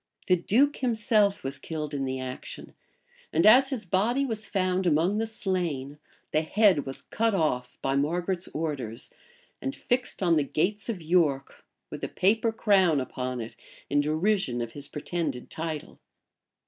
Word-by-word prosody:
The 185 - +4
duke 255 +11 +2
himself 220 -4 +2
was 135 +1 -4
killed 155 0 -5
in 135 -1 -1
the 130 0 -3
action; 130 0 -7 0.6
and 165 +4 +2
as 255 +5 +7
his 245 -7 -4
body 225 +10 +1
was 225 -4 -4
found 185 -1 0
among 170 +6 +2
the 225 - -1
slain, 170 - -3 0.3
the 155 - +2
head 180 -3 +3
was 135 - -6
cut 225 -2 0
off 125 -8 -1
by 135 0 +1
Margaret's 175 +5 0
orders, 145 -8 -4 0.5
and 135 - -3
fixed 245 -4 -1
on 170 -3 +4
the 150 - +3
gates 195 - -1
of 190 -7 -3
York, 155 -5 +1 0.3
with - - -7
a - - -2
paper 225 +4 +2
crown 190 -8 +3
upon 130 -1 -3
it, 115 - -8 0.4
in 145 0 +4
derision 155 - +1
of 120 -1 -3
his 145 +2 -5
pretended 150 -4 -4
title. 160 -2 -5
170 Hz, 160 wpm, -27 LUFS, 140-210 Hz, 0.6 s, as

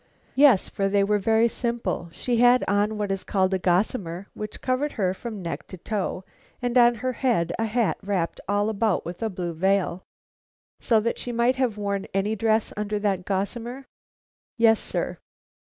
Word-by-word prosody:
"Yes, 265 -7 +5
for 195 0 -1
they 200 0 +3
were 210 +1 +2
very 220 +3 +3
simple. 235 -7 -2
She 240 +7 -1
had 245 +1 +5
on 205 +2 +1
what 205 -1 -2
is 195 -1 -2
called 190 -1 +1
a 190 - +1
gossamer, 180 0 0
which 210 0 -6
covered 265 +3 -1
her 185 -3 0
from 215 -1 -7
neck 165 0 -5
to 185 - -9
toe, 190 0 -3 0.4
and 245 -1 -2
on 240 -1 +6
her 255 +3 -2
head 230 -11 0
a 225 - +1
hat 225 0 0
wrapped 190 -4 -2
all 205 +1 +2
about 215 -2 0
with 175 +1 -7
a 225 - 0
blue 180 -3 -4
veil." 185 +1 +1 0.8
"So 225 -2 +3
that 230 +2 -2
she 245 - -4
might 240 +2 +2
have 250 -5 0
worn 200 -1 -2
any 205 +3 +1
dress 220 +1 +1
under 210 0 -2
that 195 -3 -1
gossamer?" 235 +7 -3 0.7
"Yes, 225 -1 +5
sir." - - -3
210 Hz, 180 wpm, -25 LUFS, 190-235 Hz, 0.8 s, on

